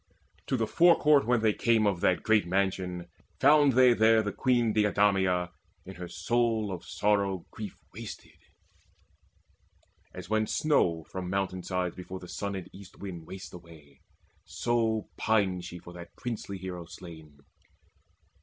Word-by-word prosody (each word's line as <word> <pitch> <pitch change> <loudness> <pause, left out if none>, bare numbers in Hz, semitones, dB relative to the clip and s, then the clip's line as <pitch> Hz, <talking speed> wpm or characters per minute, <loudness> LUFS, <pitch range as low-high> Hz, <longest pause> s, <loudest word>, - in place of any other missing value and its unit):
To 130 - 0
the 115 - +1
forecourt 150 -1 +4
when 120 -2 +3
they 110 -1 +3
came 115 -1 +2
Of 95 -4 0
that 90 - +2
great 110 -4 +3
mansion, 90 -1 -1 0.3
found 145 -2 +5
they 125 0 +6
there 110 -1 +4
the 105 - -2
Queen 120 -3 +1
Deidameia 95 -4 +2 0.3
in 95 - -9
her 90 0 -6
sorrow 110 +4 0
of 90 - -6
soul 100 -3 0
Grief 105 -3 -7 0.2
wasted, - - -10 1.7
as - - -9
when 110 0 +1
snow 85 - +1
from 90 +2 -6
mountain 95 -1 -2
sides 90 -1 -2
Before 95 0 -7
the 90 - -10
sun 100 +2 -4
and 95 -2 -6
east 100 -1 -13
wind 85 -5 -8
wastes 95 0 -9
away; 80 -5 -15 0.4
So 115 -2 -1
pined 95 -5 +1
she 90 -1 -8
for 85 0 -12
that 85 -1 -11
princely 110 -5 -5
hero 90 -2 -6
slain. 80 -4 -12
100 Hz, 145 wpm, -29 LUFS, 90-110 Hz, 1.7 s, they